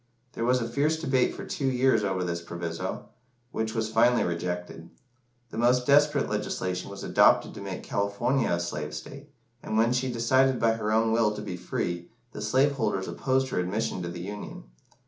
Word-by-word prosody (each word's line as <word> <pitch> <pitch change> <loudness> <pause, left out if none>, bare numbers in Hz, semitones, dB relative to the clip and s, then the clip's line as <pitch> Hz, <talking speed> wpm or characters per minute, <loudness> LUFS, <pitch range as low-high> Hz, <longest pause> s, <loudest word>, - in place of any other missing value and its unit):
There 115 - -2
was 125 +1 +3
a 115 - -2
fierce 145 +6 +1
debate 130 -5 +1
for - - -7
two 135 - -2
years 130 -3 +3
over 95 -2 -1
this 85 -1 -2
proviso, 85 -1 -5 0.4
which 110 -1 -2
was 110 -1 -1
finally 120 +2 +4
rejected. 90 -1 -4 0.6
The - - -5
most 125 +1 +3
desperate 145 +2 +4
legislation 95 -3 -3
was - - -8
adopted - - +4
to - - -9
make - - -6
California 100 +6 0
a 85 - +1
slave 75 -3 -4
state, 140 - -9 0.3
and 110 - -2
when 115 +2 +3
she 125 +1 0
decided 130 +2 +3
by 115 -1 +3
her 110 -1 -2
own 110 +1 +3
will 110 -2 +2
to 105 - -5
be 95 -4 -5
free, 85 0 -3 0.2
the - - -7
slave 130 +7 +3
holders 105 -8 -1
opposed 130 0 0
her - - -1
admission 95 +1 -2
to 85 - -4
the 85 0 -6
Union. 105 +3 -7
110 Hz, 185 wpm, -27 LUFS, 90-125 Hz, 0.6 s, finally